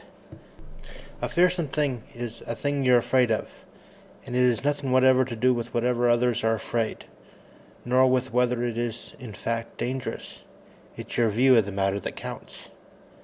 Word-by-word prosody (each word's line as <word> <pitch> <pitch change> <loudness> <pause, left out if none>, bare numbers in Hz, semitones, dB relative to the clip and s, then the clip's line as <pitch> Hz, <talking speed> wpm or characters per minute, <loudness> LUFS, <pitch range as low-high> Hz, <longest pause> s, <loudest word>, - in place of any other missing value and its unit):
] - - -18
_A - - -2
fearsome 180 -2 +2
thing 135 -4 -1
is 120 -1 -6
a 115 - -3
thing 145 +2 -1
you're 125 -1 +5
afraid 125 0 +2
of 110 - -1 0.7
and 125 - -6
it 125 0 +4
has 120 -1 0
nothing 145 -2 -1
whatever 130 0 +5
to 125 -2 -5
do 125 +3 +3
with 120 0 -5
whether 120 0 +1
others 120 -1 +2
are 115 0 +2
afraid, 115 0 -3 0.8
nor 130 +1 +4
with 130 0 0
whether 125 -1 +1
it 120 -1 -2
is 120 -1 -5
in 120 -5 -9
fact 115 +1 -4
dangerous. 130 +1 -5 0.6
It's - - -5
your 115 -2 +3
view 125 +5 +4
of 115 -4 +4
the - - -4
matter 100 0 0
that - - -6
counts! - - -9
125 Hz, 170 wpm, -26 LUFS, 115-130 Hz, 0.8 s, you're